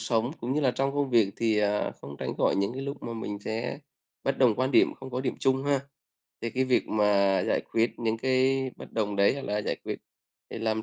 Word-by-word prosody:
sống, 115 Hz, +1 st, +1 dB
cũng 125 Hz, +3 st, -2 dB
như 150 Hz, -, +2 dB
là 130 Hz, -3 st, +3 dB
trong 135 Hz, +2 st, -1 dB
công 140 Hz, -2 st, 0 dB
việc 110 Hz, -5 st, +4 dB
thì, 110 Hz, -2 st, +2 dB
à, 105 Hz, 0 st, +1 dB
không 70 Hz, +1 st, -9 dB
tránh -, -, -4 dB
khỏi -, -, +2 dB
những 100 Hz, +3 st, 0 dB
cái 135 Hz, +2 st, -5 dB
lúc 140 Hz, +1 st, -5 dB
mà 115 Hz, -, -4 dB
mình 105 Hz, -2 st, -4 dB
sẽ 110 Hz, +5 st, -3 dB, 0.5 s
bất 135 Hz, 0 st, 0 dB
đồng 125 Hz, -5 st, +5 dB
quan 130 Hz, +4 st, 0 dB
điểm, -, -, +4 dB
không 130 Hz, 0 st, -10 dB
có 125 Hz, +1 st, -2 dB
điểm 130 Hz, -, -1 dB
chung 135 Hz, 0 st, +1 dB
ha. 140 Hz, -2 st, +2 dB, 0.6 s
Thì 115 Hz, -, -3 dB
cái 130 Hz, +2 st, +1 dB
việc 130 Hz, -1 st, +2 dB
mà 105 Hz, -1 st, +2 dB, 0.4 s
giải -, -, +2 dB
quyết 115 Hz, +1 st, +1 dB
những 115 Hz, -1 st, 0 dB
cái 130 Hz, +1 st, +2 dB
bất -, -, -11 dB
đồng 105 Hz, -2 st, -1 dB
đấy, 100 Hz, +5 st, +4 dB
hoặc 140 Hz, -, -6 dB
là 105 Hz, +1 st, -1 dB
giải -, -, -2 dB
quyết -, -, -3 dB, 0.5 s
để -, -, -5 dB
làm 110 Hz, 0 st, 0 dB
120 Hz, 245 wpm, -28 LUFS, 110-130 Hz, 0.6 s, đồng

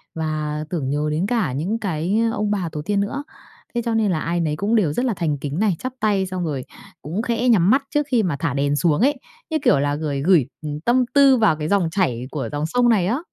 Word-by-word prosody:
và 155 Hz, -1 st, -2 dB
tưởng 150 Hz, -7 st, -2 dB
nhớ 150 Hz, +2 st, 0 dB
đến 160 Hz, +5 st, 0 dB
cả 215 Hz, -, 0 dB
những 185 Hz, +11 st, -2 dB
cái, 185 Hz, +1 st, -1 dB
ơ, -, -, -4 dB
ông 210 Hz, 0 st, 0 dB
bà 185 Hz, -5 st, -1 dB
tổ 150 Hz, -, -4 dB
tiên 200 Hz, +5 st, -1 dB
nữa, 280 Hz, +8 st, -3 dB, 0.5 s
thế 235 Hz, -, +1 dB
cho 230 Hz, -, 0 dB
nên 215 Hz, -4 st, +2 dB
là 160 Hz, -, 0 dB
ai 170 Hz, +2 st, -1 dB
nấy 155 Hz, -2 st, 0 dB
cũng 205 Hz, +7 st, 0 dB
đều 175 Hz, -10 st, +2 dB
rất 245 Hz, -, -1 dB
là 235 Hz, -, +1 dB
thành 160 Hz, -5 st, -1 dB
kính 145 Hz, +5 st, -4 dB
này, 210 Hz, -5 st, +2 dB
chắp 255 Hz, 0 st, -5 dB
tay 205 Hz, -3 st, +1 dB
xong 185 Hz, -2 st, -3 dB
rồi 140 Hz, -5 st, -3 dB, 0.4 s
cũng 170 Hz, +9 st, -3 dB
khẽ 240 Hz, +1 st, 0 dB
nhắm 190 Hz, -5 st, +4 dB
mắt 270 Hz, +5 st, +4 dB
trước 295 Hz, -1 st, +1 dB
khi 230 Hz, -4 st, +3 dB
mà 165 Hz, -6 st, -1 dB
thả 155 Hz, -5 st, -1 dB
đèn 140 Hz, +1 st, 0 dB
xuống 160 Hz, +3 st, +2 dB
ấy, 285 Hz, +3 st, +2 dB, 0.3 s
như 315 Hz, -, 0 dB
kiểu 140 Hz, -, +4 dB
là, 145 Hz, 0 st, 0 dB
gửi 145 Hz, -3 st, -3 dB
gửi, 170 Hz, -7 st, +4 dB, 0.2 s
ừm, 150 Hz, -1 st, -5 dB
tâm 245 Hz, +5 st, +2 dB
tư 275 Hz, -2 st, +6 dB
vào 215 Hz, -8 st, +3 dB
cái 155 Hz, 0 st, -3 dB
dòng 190 Hz, -4 st, +2 dB
chảy 130 Hz, -, -1 dB
của 145 Hz, -3 st, -3 dB
dòng 145 Hz, +1 st, -1 dB
sông 245 Hz, +6 st, +2 dB
này 190 Hz, -6 st, +3 dB
á. 245 Hz, +6 st, 0 dB
180 Hz, 260 wpm, -21 LUFS, 150-220 Hz, 0.5 s, tư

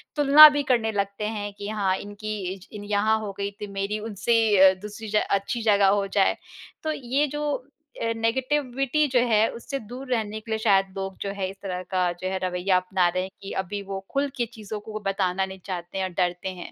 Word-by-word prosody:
तुलना 295 Hz, +1 st, +10 dB
भी 290 Hz, -, +1 dB
करने 225 Hz, -2 st, +2 dB
लगते 200 Hz, 0 st, -2 dB
हैं 205 Hz, 0 st, -4 dB
कि, 200 Hz, 0 st, -7 dB
"हाँ, 200 Hz, -3 st, 0 dB
इनकी 210 Hz, +1 st, -6 dB, 0.2 s
इज 190 Hz, 0 st, -13 dB
इन 210 Hz, -1 st, -8 dB
यहाँ 220 Hz, +2 st, +3 dB
हो 200 Hz, -, -4 dB
गई 200 Hz, 0 st, -2 dB
थी, 210 Hz, -, -4 dB
मेरी 200 Hz, +2 st, -3 dB
उनसे 225 Hz, +2 st, +1 dB, 0.3 s
अ, -, -, -3 dB
दूसरी 210 Hz, +2 st, -8 dB
ज 210 Hz, -, -3 dB
अच्छी 200 Hz, +4 st, 0 dB
जगह 205 Hz, -3 st, +4 dB
हो 195 Hz, -, -3 dB
जाए।" 195 Hz, 0 st, +2 dB, 0.5 s
तो 315 Hz, -, 0 dB
ये 275 Hz, 0 st, 0 dB
जो 295 Hz, 0 st, -2 dB, 0.4 s
अ, 230 Hz, -, 0 dB
नेगेटिविटी 265 Hz, +4 st, 0 dB
जो 250 Hz, -, +5 dB
है, 220 Hz, -1 st, +4 dB
उससे 275 Hz, +4 st, -5 dB
दूर 255 Hz, +2 st, -8 dB
रहने 220 Hz, -2 st, -1 dB
के 225 Hz, +1 st, -10 dB
लिए 220 Hz, -, +1 dB
शायद 195 Hz, -3 st, +3 dB
लोग 195 Hz, 0 st, -4 dB
जो 200 Hz, -, -2 dB
है 190 Hz, -1 st, -1 dB
इस 195 Hz, -, -9 dB
तरह 185 Hz, -2 st, -4 dB
का 185 Hz, -, +2 dB, 0.2 s
जो 185 Hz, -, -2 dB
है 190 Hz, -, -1 dB
रवैया 185 Hz, +1 st, +1 dB
अपना 185 Hz, 0 st, +1 dB
रहे 185 Hz, +1 st, -1 dB
हैं 190 Hz, -, -6 dB
कि 195 Hz, -, -7 dB
अभी 200 Hz, +2 st, -5 dB
वो 195 Hz, 0 st, -5 dB
खुल 280 Hz, +1 st, +1 dB
के 240 Hz, -, +1 dB
चीज़ों 215 Hz, -2 st, -6 dB
को 215 Hz, +1 st, -7 dB
बताना 190 Hz, -1 st, 0 dB
नहीं 190 Hz, 0 st, -10 dB
चाहते 180 Hz, 0 st, -5 dB
हैं 190 Hz, -, 0 dB
और 185 Hz, -, -5 dB
डरते 180 Hz, +1 st, 0 dB
हैं। 175 Hz, -, -8 dB
205 Hz, 225 wpm, -25 LUFS, 195-235 Hz, 0.5 s, तुलना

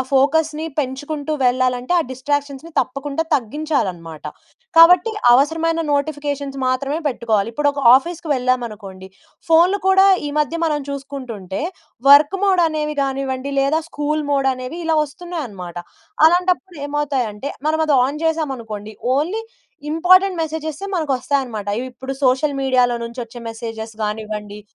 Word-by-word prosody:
ఫోకస్‌ని 310 Hz, +3 st, +2 dB
పెంచుకుంటూ 290 Hz, +2 st, -3 dB
వెళ్ళాలంటే 250 Hz, +3 st, +1 dB
ఆ -, -, +1 dB
డిస్ట్రాక్షన్స్‌ని 285 Hz, +4 st, -3 dB
తప్పకుండా 275 Hz, +4 st, -3 dB
తగ్గించాలనమాట. 215 Hz, -, -2 dB, 0.5 s
కాబట్టి 355 Hz, +5 st, +7 dB, 0.2 s
అవసరమైన 325 Hz, +5 st, +2 dB
నోటిఫికేషన్స్ 285 Hz, -1 st, -2 dB
మాత్రమే 275 Hz, +4 st, -1 dB
పెట్టుకోవాలి. 225 Hz, -5 st, 0 dB
ఇప్పుడొక 285 Hz, 0 st, 0 dB, 0.2 s
ఆఫీస్‌కి 335 Hz, +3 st, -4 dB
వెళ్ళామనుకోండి 225 Hz, -7 st, -3 dB, 0.4 s
ఫోన్‌లు 350 Hz, +5 st, +4 dB
కూడా 385 Hz, +1 st, +6 dB, 0.2 s
ఈ -, -, -4 dB
మధ్య 300 Hz, +2 st, 0 dB
మనం 300 Hz, -2 st, 0 dB
చూసుకుంటుంటే 260 Hz, -9 st, -6 dB, 0.5 s
వర్క్ 295 Hz, +6 st, +7 dB
మోడ్ 375 Hz, -3 st, +3 dB
అనేవి 300 Hz, -1 st, -3 dB
గానివ్వండి 270 Hz, 0 st, -3 dB
లేదా 295 Hz, +4 st, +2 dB
స్కూల్ 300 Hz, +1 st, -2 dB
మోడ్ 275 Hz, -1 st, +2 dB
అనేవి 255 Hz, +7 st, -7 dB
ఇలా 325 Hz, -1 st, +1 dB
వస్తున్నాయనమాట, 280 Hz, -, -7 dB, 0.5 s
అలాంటప్పుడు 360 Hz, +1 st, +1 dB
ఏమవుతాయంటే 275 Hz, -5 st, -2 dB, 0.2 s
మనం 315 Hz, 0 st, +1 dB
అది 295 Hz, -, +3 dB
ఆన్ 300 Hz, +4 st, -5 dB
చేసామనుకోండి 235 Hz, -10 st, -3 dB, 0.2 s
ఓన్లీ 365 Hz, +10 st, -1 dB, 0.5 s
ఇంపార్టెంట్ 365 Hz, +3 st, +4 dB
మెసేజెస్సే 315 Hz, +2 st, -4 dB
మనకొస్తాయనమాట. 265 Hz, -, -1 dB
ఇవిప్పుడు 260 Hz, +1 st, -6 dB
సోషల్ 275 Hz, +3 st, +2 dB
మీడియాలో 250 Hz, -2 st, +2 dB
నుంచొచ్చే 235 Hz, 0 st, -7 dB
మెసేజెస్ 225 Hz, -1 st, -7 dB
గానివ్వండి 210 Hz, -1 st, -5 dB
280 Hz, 115 wpm, -20 LUFS, 250-315 Hz, 0.5 s, కాబట్టి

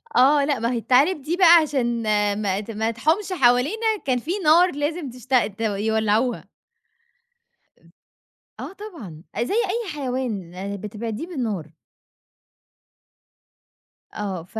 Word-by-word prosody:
آه، 280 Hz, +3 st, +5 dB
لأ 280 Hz, -4 st, 0 dB
ما 230 Hz, +2 st, -1 dB
هي 245 Hz, -, -1 dB
التعالب 265 Hz, +8 st, +2 dB
دي 320 Hz, +6 st, -2 dB
بقى 345 Hz, -3 st, +8 dB
عشان 245 Hz, -6 st, -1 dB, 0.4 s
ما 195 Hz, -2 st, 0 dB
ت 215 Hz, +2 st, -7 dB
ما 220 Hz, +1 st, -1 dB
تحومش 320 Hz, -, 0 dB
حوالينا 275 Hz, -, +2 dB, 0.2 s
كان 255 Hz, -2 st, +1 dB
في 305 Hz, +9 st, -5 dB
نار 340 Hz, +4 st, +5 dB
لازم 295 Hz, +1 st, -3 dB
تشتغ 250 Hz, -1 st, 0 dB
ت 205 Hz, +1 st, -11 dB
يولّعوها. 220 Hz, +2 st, 0 dB, 1.3 s
آمم -, -, -24 dB, 0.7 s
آه -, -, -7 dB
طبعًا، 290 Hz, -, -10 dB, 0.2 s
زي 250 Hz, -, -3 dB
أي 445 Hz, 0 st, -1 dB
حيوان 205 Hz, -, -4 dB
بتبعديه 215 Hz, -, -6 dB
بالنار. 220 Hz, -, -4 dB, 2.4 s
آه، 195 Hz, -5 st, -4 dB
ف 220 Hz, +6 st, -8 dB
250 Hz, 125 wpm, -23 LUFS, 215-310 Hz, 2.4 s, بقى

